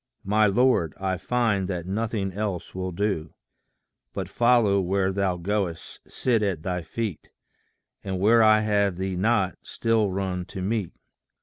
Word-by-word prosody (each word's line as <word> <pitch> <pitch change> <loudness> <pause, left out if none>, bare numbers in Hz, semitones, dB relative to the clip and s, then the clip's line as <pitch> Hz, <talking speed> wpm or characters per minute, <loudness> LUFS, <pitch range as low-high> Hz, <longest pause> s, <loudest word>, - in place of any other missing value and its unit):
My 105 +2 +3
Lord, 100 - +2
I 95 -1 -1
find 110 -2 0
that 90 -3 -4
nothing 100 0 -2
else 100 -3 -4
will 95 0 -3
do, 85 -4 -2 0.8
But - - -4
follow 115 -5 +3
where 95 +1 +1
thou 95 -2 0
goest, 90 -2 -3
sit 120 -4 0
at 95 -7 -1
thy 90 -1 -2
feet, 100 +2 -5 0.7
And 95 -1 -3
where 115 +4 +5
I 110 -1 +6
have 100 -3 +1
thee 95 0 -2
not, 95 -1 +1
still 115 -3 0
run 95 -1 -3
to 95 - -7
meet. 100 -3 -1
100 Hz, 145 wpm, -25 LUFS, 95-110 Hz, 0.8 s, I